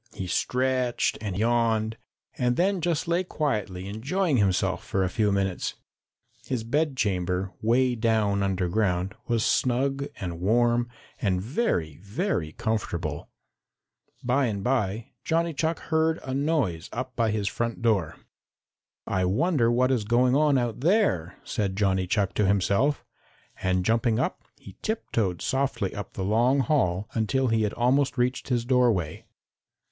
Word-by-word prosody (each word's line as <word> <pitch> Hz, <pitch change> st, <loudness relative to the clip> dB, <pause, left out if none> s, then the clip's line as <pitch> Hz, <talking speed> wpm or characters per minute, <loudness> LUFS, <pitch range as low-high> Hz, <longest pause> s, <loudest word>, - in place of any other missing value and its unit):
He 95 Hz, -, -4 dB
stretched 125 Hz, +6 st, 0 dB
and 100 Hz, -4 st, -3 dB
yawned 115 Hz, -1 st, +1 dB, 0.4 s
and 125 Hz, -1 st, +1 dB
then 190 Hz, +3 st, +1 dB
just 165 Hz, -2 st, 0 dB
lay 170 Hz, +2 st, +1 dB
quietly 105 Hz, -, -2 dB
enjoying 140 Hz, -, 0 dB
himself 95 Hz, -3 st, +1 dB
for 95 Hz, -, -1 dB
a 95 Hz, -, 0 dB
few 105 Hz, -1 st, +1 dB
minutes. 95 Hz, -2 st, -1 dB, 0.7 s
His 125 Hz, -4 st, -2 dB
bedchamber, 100 Hz, -, 0 dB
way 125 Hz, +3 st, +3 dB
down 110 Hz, -3 st, +1 dB
underground, 95 Hz, 0 st, 0 dB
was 115 Hz, -2 st, +1 dB
snug 135 Hz, +3 st, +1 dB
and 85 Hz, -3 st, -4 dB
warm 120 Hz, +5 st, +2 dB, 0.3 s
and 95 Hz, -3 st, +1 dB
very, 95 Hz, -, -1 dB
very 100 Hz, -, -2 dB
comfortable. 85 Hz, -9 st, -3 dB, 0.9 s
By 130 Hz, +2 st, +2 dB
and 100 Hz, -3 st, -3 dB
by, 110 Hz, -3 st, -1 dB
Johnny 165 Hz, 0 st, 0 dB
Chuck 160 Hz, +3 st, 0 dB
heard 160 Hz, 0 st, 0 dB
a 130 Hz, -, -4 dB
noise 135 Hz, -, 0 dB
up 130 Hz, +2 st, -5 dB
by 115 Hz, -2 st, +1 dB
his 105 Hz, -2 st, -1 dB
front 115 Hz, +3 st, -3 dB
door. 100 Hz, -9 st, +1 dB, 0.9 s
"I 95 Hz, -, 0 dB
wonder 120 Hz, -, +2 dB
what 130 Hz, +2 st, +2 dB
is 125 Hz, -5 st, +1 dB
going 125 Hz, +4 st, +3 dB
on 150 Hz, -1 st, +4 dB
out 120 Hz, -3 st, -1 dB
there," 135 Hz, -, +1 dB
said 100 Hz, -3 st, -2 dB
Johnny 95 Hz, -2 st, +1 dB
Chuck 100 Hz, 0 st, 0 dB
to 105 Hz, -, +1 dB
himself, 100 Hz, +9 st, +1 dB, 0.6 s
and 95 Hz, -1 st, +1 dB
jumping 115 Hz, 0 st, +2 dB
up, -, -, -1 dB, 0.2 s
he 95 Hz, 0 st, -14 dB
tiptoed 110 Hz, -, -1 dB
softly 130 Hz, -7 st, -1 dB
up 100 Hz, -1 st, -7 dB
the 95 Hz, -, -3 dB
long 120 Hz, +7 st, +3 dB
hall 105 Hz, -, +1 dB
until 125 Hz, +3 st, +1 dB
he 115 Hz, 0 st, +2 dB
had 105 Hz, -1 st, 0 dB
almost 130 Hz, +3 st, +2 dB
reached 125 Hz, +1 st, 0 dB
his 120 Hz, -2 st, 0 dB
doorway. 120 Hz, -, +1 dB
115 Hz, 140 wpm, -26 LUFS, 95-130 Hz, 0.9 s, on